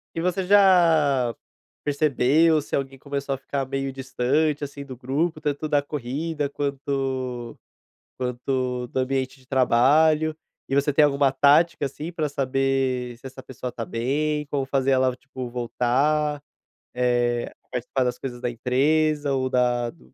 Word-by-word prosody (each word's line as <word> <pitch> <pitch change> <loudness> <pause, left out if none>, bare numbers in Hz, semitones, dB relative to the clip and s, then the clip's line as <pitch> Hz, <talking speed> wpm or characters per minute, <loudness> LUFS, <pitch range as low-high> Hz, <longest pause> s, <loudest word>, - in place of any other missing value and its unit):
E 165 - -1
você 180 +2 0
já 165 - +4 0.5
percebeu 150 +2 +3
se - - -8
alguém 135 -1 -2
começou 140 0 -3
a - - -6
ficar 140 0 -3
meio 135 0 -3
distante, 135 +3 0
assim, 140 0 -8
do 130 -2 -9
grupo, 150 +6 -1
tanto 150 0 -2
da 145 -1 +2
corrida, 145 +2 -3
quanto 135 -4 -3 0.6
quanto 125 0 -2
do 130 - -3
ambiente 130 0 -2
de 130 - -24
trabalho? 150 +5 +3 0.3
E 135 - -1
você 140 +1 +2
tem 150 +2 +5
alguma 140 -2 +3
tática, 145 +2 +4
assim, 150 +5 -6
pra 155 -3 -1
saber 135 -2 -1
se 130 - -12
essa 130 0 -9
pessoa 125 -1 -6
está 115 - -5
bem? 150 +6 -1
Como 140 -1 -2
fazer 135 0 +1
ela, 130 -1 +2
tipo, 130 -1 -8
voltar? 140 +5 0 0.5
Eh, 120 -1 +1 0.2
participar 125 +1 -1
das 125 - -2
coisas 120 -2 -6
da 120 - -1
empresa, 145 +5 +1
ou 130 -1 0
da 125 -2 +1
do 165 - -23
135 Hz, 150 wpm, -24 LUFS, 125-150 Hz, 0.6 s, tem